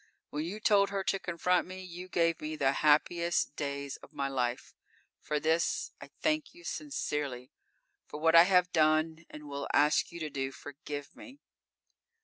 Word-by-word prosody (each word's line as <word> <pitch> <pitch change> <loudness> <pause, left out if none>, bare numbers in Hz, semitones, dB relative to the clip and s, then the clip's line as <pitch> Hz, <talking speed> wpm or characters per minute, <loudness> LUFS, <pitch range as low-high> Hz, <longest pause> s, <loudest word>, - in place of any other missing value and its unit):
When 150 +1 -2
you 195 +5 -5
told 200 -2 +4
her 200 -1 -2
to 195 - 0
confront 180 0 0
me, 185 0 -8
you 180 0 -9
gave 165 -2 +1
me 155 +1 -4
the 135 -3 +2
happiest 155 +3 +2
days 140 -1 -4
of - - -16
my 140 - -1
life. 125 -2 -2 0.5
For 150 -1 -2
this 160 +2 0
I - - -10
thank 310 0 0
you 345 - -15
sincerely. 145 - -4 0.6
For 150 - -7
what 165 +1 +3
I 170 +1 +9
have 180 -1 +3
done 160 +1 +2
and 150 -1 -10
will 140 0 -4
ask 150 +1 +3
you 170 - -8
to 155 -2 -4
do, 135 -1 -3
forgive 145 +1 -8
me! 270 0 -12
160 Hz, 170 wpm, -31 LUFS, 145-180 Hz, 0.6 s, I